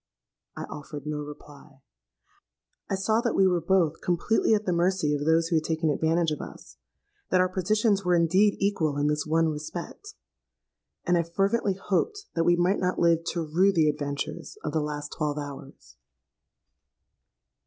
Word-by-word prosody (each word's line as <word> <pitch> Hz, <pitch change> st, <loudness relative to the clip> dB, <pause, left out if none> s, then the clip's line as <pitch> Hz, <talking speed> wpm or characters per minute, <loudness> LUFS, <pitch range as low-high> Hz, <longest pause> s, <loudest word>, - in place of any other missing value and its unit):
'—I -, -, -4 dB
offered 145 Hz, 0 st, -8 dB
no 150 Hz, 0 st, -3 dB
reply: 145 Hz, -1 st, -12 dB, 1.1 s
I 195 Hz, -, 0 dB
saw 215 Hz, +4 st, +1 dB
that 235 Hz, -1 st, -1 dB
we 195 Hz, -, +4 dB
were 180 Hz, -2 st, +2 dB
both 170 Hz, -2 st, +1 dB
completely 195 Hz, +5 st, +2 dB
at 210 Hz, 0 st, -2 dB
the 180 Hz, -, +1 dB
mercy 170 Hz, -3 st, +1 dB
of 145 Hz, 0 st, -2 dB
those 165 Hz, +1 st, +3 dB
who 165 Hz, -, +2 dB
had 155 Hz, -, 0 dB
taken 160 Hz, -1 st, 0 dB
advantage 165 Hz, +2 st, +1 dB
of 150 Hz, -, -3 dB
us,—that 65 Hz, -, -7 dB
our 185 Hz, -, +4 dB
positions 200 Hz, +2 st, +1 dB
were 180 Hz, -1 st, +2 dB
indeed 185 Hz, +5 st, +3 dB
equal 165 Hz, -8 st, 0 dB
in 145 Hz, -, 0 dB
this 150 Hz, 0 st, 0 dB
one 160 Hz, +1 st, +2 dB
respect; 170 Hz, -, -7 dB, 0.9 s
and 175 Hz, -1 st, +3 dB
I -, -, +4 dB
fervently 195 Hz, +4 st, 0 dB
hoped 400 Hz, -, -2 dB
that 165 Hz, -1 st, 0 dB
we 175 Hz, -, +5 dB
might 180 Hz, +3 st, +1 dB
not 180 Hz, 0 st, -1 dB
live 165 Hz, -1 st, +3 dB
to 170 Hz, -1 st, -2 dB
rue 180 Hz, +6 st, +3 dB
the 160 Hz, -5 st, +3 dB
adventures 145 Hz, -, -4 dB
of -, -, -2 dB
the 160 Hz, -, +1 dB
last 150 Hz, 0 st, -5 dB
twelve 150 Hz, -1 st, -2 dB
hours! 140 Hz, -, -9 dB
165 Hz, 165 wpm, -26 LUFS, 150-190 Hz, 1.1 s, we